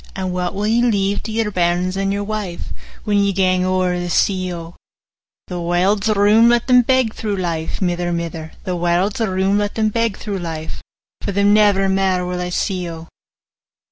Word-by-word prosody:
And 185 -1 -3
what 180 0 -2
will 205 +1 -2
ye 230 +2 +2
leave 205 -4 +1
to 220 - -6
your 220 -1 -1
bairns 180 0 0
and 195 0 -1
your 200 0 -2
wife, 205 -4 -5 0.3
When 205 -2 +1
ye 200 0 +2
gang 185 -1 +2
owre 185 -1 0
the 175 0 -4
sea, 185 +1 +1
O?' 170 0 -8 0.7
'The 180 -1 -5
warld's 190 +5 +1
room: 215 +2 +5
let 240 -1 +2
them 250 -1 +6
beg 255 -2 +1
through 210 -2 -3
life, 165 -4 -3
45 - - -15
Mither, 175 -1 -1
mither; 165 -2 -4
The 185 - -2
warld's 175 +4 0
room: 195 -1 +1
let 205 0 -2
them 220 -1 +1
beg 230 -1 -1
through 200 -3 -4
life; 160 -2 -6 0.4
For - - -3
them 200 +1 +3
never 205 -2 +4
mair 190 -1 +1
will 180 0 -3
I 180 - -3
see, 180 -1 -2
O. 165 0 -9
190 Hz, 195 wpm, -19 LUFS, 180-210 Hz, 0.7 s, them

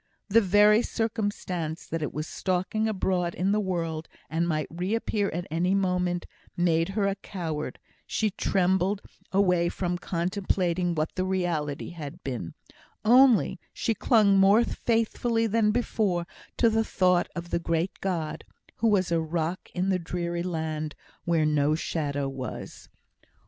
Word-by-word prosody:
The 225 +3 +6
very 210 +2 +5
circumstance 205 -9 -2
that 165 - -4
it 150 - -2
was 155 +1 -4
stalking 185 +6 -1
abroad 185 -4 0
in 190 +2 +1
the 210 - +2
world, 165 -5 -2 0.2
and 165 +2 +1
might 155 -2 0
reappear 200 +4 -1
at 175 +2 -4
any 180 +4 +1
moment, 180 -2 0 0.3
made 165 -1 +2
her 205 - +2
a 200 - +1
coward: 170 -6 -5 0.3
she 215 -1 0
trembled 190 +1 +1 0.3
away 180 -3 +3
from 175 -1 -2
contemplating 180 -1 0
what 155 0 -1
the 185 - -1
reality 175 -7 -1
had 150 -5 -8
been; 120 -11 -5 0.5
only 245 -4 +5
she 230 - 0
clung 210 -4 +4
more 200 +4 +6
faithfully 230 0 0
than 220 0 +2
before 210 -6 0 0.3
to 235 - +4
the 225 0 +2
thought 180 -4 +2
of 175 0 -6
the - - +1
great 170 +2 0
God, 170 -5 -2 0.3
who 230 - +2
was 190 -5 +2
a 165 -1 +2
rock 165 +2 -3
in 185 +2 0
the 185 -1 +2
dreary 170 0 -3
land, 160 -3 -3 0.3
where 165 -2 +2
no 150 0 +2
shadow 145 -4 -2
was. 135 -1 -7
180 Hz, 145 wpm, -27 LUFS, 165-200 Hz, 0.5 s, The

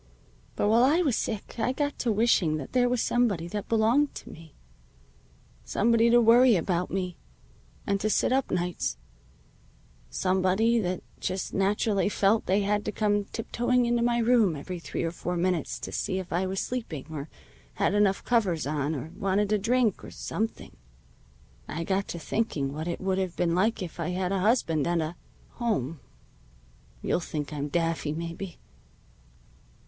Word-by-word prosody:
But - - +1
while 230 +3 +5
I 310 +7 +4
was 275 -8 +2
sick 220 +1 -4
I 250 +3 +1
got 290 +1 -2
to 240 - +1
wishing 205 -8 +3
that 140 - -7
there 245 -1 +3
was 245 -2 +1
somebody 205 -9 +1
that 205 +2 -5
belonged 230 +6 +3
to - - -9
me. 160 -2 -14 1.1
Somebody 230 - +3
to 240 +1 +6
worry 240 +1 +6
about 180 0 0
me, 180 -2 -3 0.7
and 200 -1 0
to 215 - +1
sit 215 - +2
up 270 0 +1
nights 180 - -1 1.1
somebody 190 - +2
that 185 -3 -2 0.2
just 185 0 -3
naturally 200 +1 +1
felt 210 +2 +2
they 195 +3 +3
had 205 +1 0
to - - -1
come 205 -1 +1
tiptoeing 240 +3 0
into 235 0 +1
my 235 0 +2
room 230 -7 +3
every 175 +5 -6
three - - -4
or 165 - -1
four 180 +1 -3
minutes 175 -3 0
to - - -5
see 190 - -2
if 185 -2 -5
I 185 +2 +1
was 190 0 -2
sleeping, 225 - -4
or 150 -1 -6 0.5
had - - +1
enough 205 -2 +2
covers 195 - +1
on, 150 +1 -1
or 150 +4 -6
wanted 195 +1 0
a 210 - +3
drink, 235 0 +1
or - - -8
something. 220 +1 -4 0.9
I 165 - -4
got 195 +3 -1
to - - -5
thinking 155 -6 -2
what 155 +3 -4
it 170 - -3
would 190 0 0
have 185 -2 -2
been 170 -1 +1
like 195 +3 +1
if 175 -1 -8
I 170 - -1
had 180 +1 -1
a 195 - +1
husband 180 - +2
and 175 0 +1
a 155 +3 -5 0.4
home. 165 - -1 1.0
You'll - - +1
think 150 -3 -5
I'm 145 -1 -3
daffy, 165 -1 -1
maybe." 170 +2 -6
195 Hz, 170 wpm, -27 LUFS, 170-230 Hz, 1.1 s, to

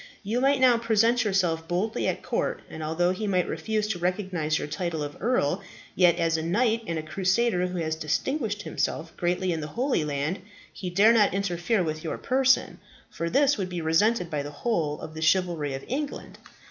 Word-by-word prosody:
You 225 +5 -1
might 275 +1 +3
now 250 -3 +5
present 230 +2 +3
yourself 175 -6 0
boldly 185 +6 -1
at - - -2
court, - - -2
and 160 - -7
although 165 +3 +1
he 210 +3 -3
might 185 -3 +1
refuse 215 -1 -1
to 190 -5 -2
recognize 180 -4 -1
your - - -4
title 160 +1 -3
of 145 0 -6
earl, 195 - +1 0.3
yet, 175 -2 +5
as 165 -1 +1
a - - -2
knight 225 +7 +1
and 165 - -2
a 155 - -3
crusader 190 +3 +1
who 180 0 -5
has 160 -2 -1
distinguished 210 - -2
himself 165 +1 -3
greatly 180 +1 0
in 160 - -3
the 150 - -4
Holy 255 - +1
Land, 150 +4 -2 0.3
he 185 - -5
dare 200 +6 +5
not 210 -4 +3
interfere 195 +1 0
with 155 -1 -4
your 160 - -3
person, 260 0 +2 0.3
for 170 - -3
this 275 +1 +3
would 185 -2 -2
be 180 -1 -4
resented 175 +4 +2
by 150 -2 -1
the 145 - -6
whole 155 -4 -1
of 155 - -8
the 160 - -7
chivalry 160 -4 +1
of 135 - -8
England. 285 +3 -4
180 Hz, 195 wpm, -26 LUFS, 160-220 Hz, 0.3 s, now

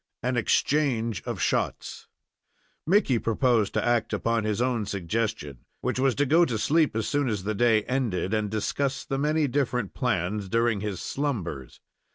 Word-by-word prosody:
AN 125 +1 0
EXCHANGE 120 -2 +1
OF - - -3
SHOTS - - -2 0.8
Mickey 165 - +3
proposed 115 -2 +1
to - - +1
act 120 -2 +1
upon 115 -1 0
his 105 0 -1
own 125 -3 0
suggestion, 95 - -3 0.2
which - - -1
was 130 -2 +2
to 145 - +2
go 160 +6 +5
to 120 -9 0
sleep 155 +4 +2
as 110 -1 -1
soon 145 -2 0
as 105 -4 -2
the 110 +2 -1
day 110 0 +3
ended 115 -7 -1
and 110 -1 0
discuss 130 +6 -2
the 135 - -2
many 150 +1 +1
different 125 -5 -1
plans 105 -4 -1
during 115 -1 +1
his 100 -4 -3
slumbers. 100 - -4
115 Hz, 165 wpm, -26 LUFS, 105-135 Hz, 0.8 s, go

